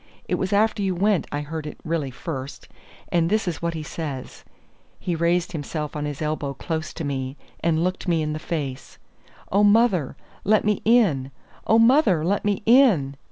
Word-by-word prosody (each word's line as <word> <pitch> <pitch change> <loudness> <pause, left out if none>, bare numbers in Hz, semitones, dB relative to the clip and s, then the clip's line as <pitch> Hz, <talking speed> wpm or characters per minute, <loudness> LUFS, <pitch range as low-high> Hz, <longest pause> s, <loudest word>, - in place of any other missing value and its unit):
It - - -2
was 190 - -2
after 215 +1 +2
you 190 -2 0
went 200 +1 +1
I 145 - -2
heard 155 +1 -5
it - - -8
really 155 -4 -1
first; 135 0 -7 0.4
and 170 -1 +2
this 215 -1 +1
is 175 - -3
what 170 0 -2
he 155 - -4
says." 150 -4 -6 0.6
He 180 - -2
raised 170 +1 +1
himself 150 -1 -4
on 150 0 -2
his 145 0 -4
elbow 150 -2 -2
close 160 +2 -4
to 165 - -4
me, 135 -1 -3 0.2
and 165 -1 +1
looked 185 +1 -2
me 165 -3 +2
in 150 0 -2
the 155 - -4
face: 140 -5 -5 0.5
"'Oh, 200 +2 +4
mother, 205 - +3 0.3
let 215 +1 +3
me 210 -1 +1
in! 195 - +3 0.4
oh, 225 - +5
mother, 230 - +4
let 200 +3 0
me 205 0 0
in! 220 - +5
165 Hz, 185 wpm, -24 LUFS, 150-200 Hz, 0.6 s, oh